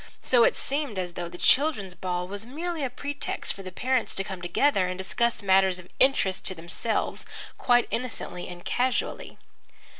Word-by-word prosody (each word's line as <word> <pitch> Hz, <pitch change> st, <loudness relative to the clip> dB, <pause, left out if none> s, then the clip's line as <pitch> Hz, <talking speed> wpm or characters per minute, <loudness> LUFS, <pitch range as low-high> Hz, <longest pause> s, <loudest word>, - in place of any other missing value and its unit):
So 245 Hz, -2 st, +5 dB
it -, -, +3 dB
seemed 280 Hz, -6 st, -2 dB
as 180 Hz, -2 st, -3 dB
though 175 Hz, -1 st, -4 dB
the 175 Hz, -, -9 dB
children's 255 Hz, -, +3 dB
ball 180 Hz, -1 st, -3 dB
was 200 Hz, +2 st, -5 dB
merely 315 Hz, +6 st, -4 dB
a 265 Hz, -, 0 dB
pretext 285 Hz, +3 st, -3 dB
for 195 Hz, -, -10 dB
the 185 Hz, -1 st, -7 dB
parents 255 Hz, +4 st, 0 dB
to 195 Hz, -, 0 dB
come 190 Hz, -2 st, -6 dB
together 185 Hz, +3 st, +2 dB
and 180 Hz, 0 st, -3 dB
discuss 225 Hz, +4 st, 0 dB
matters 190 Hz, -1 st, +4 dB
of 180 Hz, 0 st, -12 dB
interest 230 Hz, -8 st, +3 dB
to 185 Hz, -, 0 dB
themselves, 170 Hz, +7 st, -2 dB, 0.4 s
quite 245 Hz, -1 st, +4 dB
innocently 225 Hz, -7 st, -4 dB
and 175 Hz, -1 st, -9 dB
casually. 250 Hz, 0 st, -1 dB
200 Hz, 175 wpm, -27 LUFS, 180-255 Hz, 0.4 s, So